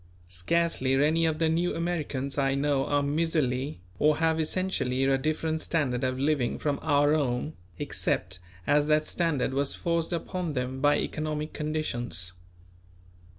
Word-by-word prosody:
Scarcely 130 - +1
any 155 +4 +3
of 155 -1 0
the 165 0 +2
New 170 +2 +1
Americans 155 -5 -2
I 135 -1 +2
know 140 -1 +1
are 145 0 +2
miserly 140 - 0 0.2
or 150 0 +4
have 160 0 +2
essentially 155 -6 0
a 135 0 +3
different 155 +3 -1
standard 130 -6 0
of 130 0 0
living 140 -3 +1
from 145 -2 -1
our 145 +1 +3
own, 140 0 0 0.2
except 90 +1 -1 0.3
as 145 0 +3
that 155 0 +3
standard 150 -8 0
was 140 +1 0
forced 170 0 -1
upon 175 -1 -3
them 130 0 -3
by 145 +1 +4
economic 155 0 -3
conditions. 120 - -2
150 Hz, 145 wpm, -28 LUFS, 130-160 Hz, 0.3 s, or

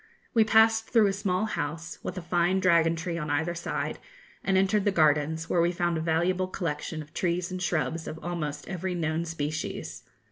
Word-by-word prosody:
We 225 -3 +6
passed 220 +1 +4
through 225 -4 +5
a 195 - +2
small 195 0 0
house, 165 -5 -4
with 185 - -5
a 180 - -5
fine 175 +2 +2
dragon 170 -3 +4
tree 170 +1 -3
on 150 -1 -4
either 160 +4 0
side, 170 0 -3 0.4
and 195 -1 +2
entered 195 +2 +3
the 205 - +2
gardens, 155 -1 +2
where 170 - +2
we 170 +1 +3
found 175 -1 0
a 160 - -1
valuable 175 +3 +1
collection 160 -3 -3
of 150 - -20
trees 175 0 -1
and 185 0 -4
shrubs 160 -2 -1
of 155 - -5
almost 150 -4 -4
every 185 -1 -3
known 160 0 -1
species. 155 -1 -4
170 Hz, 190 wpm, -28 LUFS, 160-185 Hz, 0.4 s, We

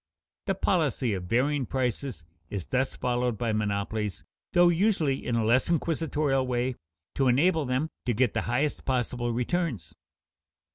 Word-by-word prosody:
The 195 - +1
policy 150 - +1
of 90 -2 -4
varying 130 +6 +1
prices 130 - -2 0.3
is 100 -4 -4
thus 130 +1 -1
followed 125 -2 0
by 115 -1 -1
monopolies, 105 -1 -2 0.3
though 175 0 +6
usually 170 -6 +1
in 120 - -1
a 115 -1 +1
less 120 +7 +3
inquisitorial 155 -5 0
way, 125 +1 0 0.4
to 135 - +1
enable 155 +5 +3
them 130 +5 -1 0.2
to 120 - +2
get 125 0 +2
the - - 0
highest 140 +5 0
possible 125 -2 -1
returns. 120 - -2
130 Hz, 145 wpm, -28 LUFS, 115-150 Hz, 0.4 s, though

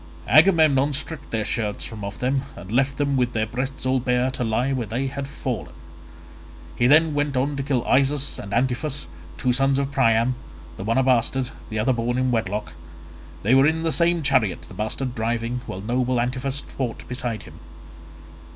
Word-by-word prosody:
Agamemnon 155 -5 +5
stripped 150 +3 -4
their 110 -2 -1
shirts 105 -3 -2
from 110 -2 -7
off 100 0 -5
them 130 +2 0
and 95 +3 -10
left 135 +3 +1
them 140 -1 +1
with 125 -2 +1
their 110 -1 +1
breasts 130 +4 -4
all 130 0 +2
bare 125 +1 +1
to 130 - -3
lie 120 +4 0
where 120 -4 -2
they 120 +6 -2
had 135 0 -4
fallen. 130 -4 -4 1.0
He 120 - +3
then 155 +3 +5
went 145 -2 0
on 140 +3 0
to 140 - -2
kill 135 -3 -1
Isus 140 +1 +2
and 100 - -7
Antiphus 130 +5 0 0.3
two 125 -2 +1
sons 135 +1 +3
of 140 0 -1
Priam, 115 -2 +3 0.4
the - - -7
one 115 +4 0
a 130 - +4
bastard, 125 0 +1 0.2
the 110 - -4
other 110 +5 +2
born 120 +1 -1
in 130 0 +1
wedlock; 105 -2 -1 0.7
they 110 +6 +3
were 135 +2 +6
in 160 +1 0
the 165 - +1
same 170 0 +2
chariot—the 110 - +1
bastard 120 +4 -3
driving, 115 +1 -2
while 95 - -5
noble 125 +3 0
Antiphus 130 +3 -1
fought 125 -4 -5
beside 125 -3 -3
him. - - -13
130 Hz, 185 wpm, -23 LUFS, 115-140 Hz, 1.0 s, were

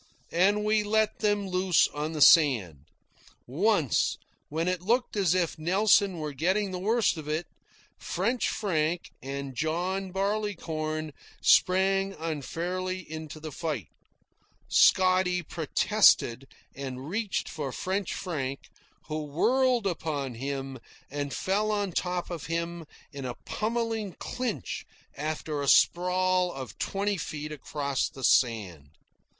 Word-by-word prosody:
And 200 +5 +3
we 215 0 +3
let 215 +1 +1
them 205 -1 +1
loose 185 -2 +3
on 150 +2 -4
the 155 - -3
sand. 115 - +5 0.6
Once, 165 - +1 0.3
when 160 +3 -1
it 180 -1 0
looked 235 +6 0
as 185 -4 +2
if 170 -3 0
Nelson 190 +2 +3
were 150 -2 -4
getting 190 +8 0
the 180 - -4
worst 215 -1 +2
of 155 -2 -7
it, 155 +3 -1 0.5
French 230 +8 -1
Frank 170 -4 -1
and 140 0 -5
John 180 +7 -1
Barleycorn 165 -6 -2 0.3
sprang 195 +1 +3
unfairly 175 +4 -3
into 155 -1 -7
the 155 0 -7
fight. 145 - -4 0.8
Scotty 185 -1 +4
protested 160 - +3 0.3
and 135 0 -6
reached 205 +3 -2
for 145 -5 -4
French 190 +4 -2
Frank, 140 -7 -4 0.3
who 155 0 -3
whirled 245 - +2
upon 155 -7 -2
him 135 +1 -4 0.3
and 145 0 -3
fell 205 +7 0
on 205 -2 -1
top 180 +1 -2
of 165 -4 -5
him 170 0 -3 0.3
in 140 -1 -6
a 125 -2 -4
pummelling 225 -3 -2
clinch 250 -4 -4 0.3
after 155 0 -3
a 140 - -3
sprawl 180 +3 +3
of 130 -4 -8
twenty 200 +1 -1
feet 150 -2 -5
across 140 -2 -2
the 135 - -11
sand. 100 - +2
170 Hz, 125 wpm, -28 LUFS, 145-195 Hz, 0.8 s, sand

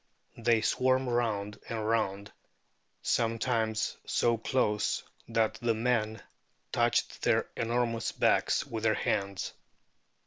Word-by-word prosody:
They 115 -1 +3
swam 130 +3 +2
round 110 -4 -1
and 110 -2 -2
round, 100 -3 0 0.7
sometimes 115 -1 0
so 120 0 +2
close 110 -2 0 0.2
that 110 0 +1
the 115 -1 +2
men 110 -1 0 0.5
touched - - +1
their - - +2
enormous 115 0 0
backs - - +2
with 115 -1 -5
their 110 -1 +3
hands." 100 -1 -1
115 Hz, 105 wpm, -30 LUFS, 110-120 Hz, 0.7 s, They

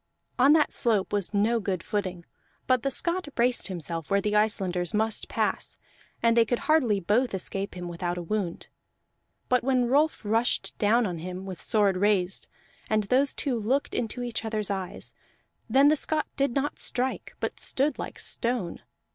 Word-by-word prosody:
On 275 +4 +7
that 310 -1 +3
slope 215 -6 0
was 205 -3 0
no 215 +3 +2
good 190 -4 -2
footing; 185 -5 -3 0.4
but 255 -2 +3
the 275 - 0
Scot 340 +5 0
braced 245 +1 +2
himself 170 -4 -5
where 200 - +3
the 210 +1 -1
Icelanders 190 -4 +1
must 220 0 0
pass, - - -1 0.5
and 230 0 +4
they 230 - +6
could 240 +2 -1
hardly 260 -10 +3
both 210 +5 +1
escape 195 +1 -4
him 175 0 -5
without 175 +1 -3
a 175 - -4
wound. 180 -1 -3 0.8
But 250 -1 +2
when 255 -1 +2
Rolf 285 0 +2
rushed 225 +3 +1
down 230 +3 +3
on 175 -4 -3
him, 180 +3 -6
with 185 -3 -6
sword 205 -4 +2
raised, 195 -2 +1 0.4
and 215 -1 +2
those 260 +7 +2
two 255 -5 0
looked 255 +7 0
into 245 +1 -2
each 240 -2 -3
other's 215 -2 -2
eyes, 190 -2 -4 0.6
then 270 +5 +6
the 305 - +4
Scot 310 +1 0
did 275 -3 0
not 280 +1 -1
strike, 255 +1 -1
but - - -3
stood 275 +1 +1
like - - -6
stone. 235 -8 -2
215 Hz, 170 wpm, -27 LUFS, 190-250 Hz, 0.8 s, On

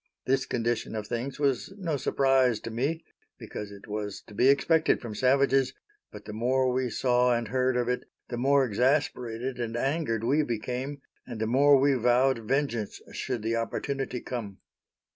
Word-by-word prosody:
This 135 +1 +1
condition 120 -1 -1
of 105 -1 -3
things 125 +6 -4
was 140 +6 0
no 170 -6 -2
surprise 135 -3 +2
to 115 - -6
me, 140 +8 -2 0.3
because 105 - -7
it 100 -1 -12
was 105 -1 -4
to - - -16
be 125 +5 +3
expected 160 +4 +3
from 115 -3 -7
savages; 135 +2 +3 0.4
but - - -11
the 105 - -7
more 130 +3 +1
we 130 0 0
saw 125 0 +2
and 115 -2 -4
heard 130 0 +1
of 120 -1 0
it, 125 0 -1 0.2
the 120 - -4
more 135 +2 +3
exasperated 125 0 0
and 115 -1 -3
angered 135 -4 -1
we 145 +6 +3
became, 130 +2 -4 0.2
and 120 -3 -6
the 110 - 0
more 140 +4 +5
we 140 +1 +4
vowed 125 +1 +3
vengeance 120 -2 -1
should 120 -4 -3
the 115 +1 0
opportunity 130 +2 -3
come. 105 -6 -5
125 Hz, 170 wpm, -28 LUFS, 115-135 Hz, 0.4 s, more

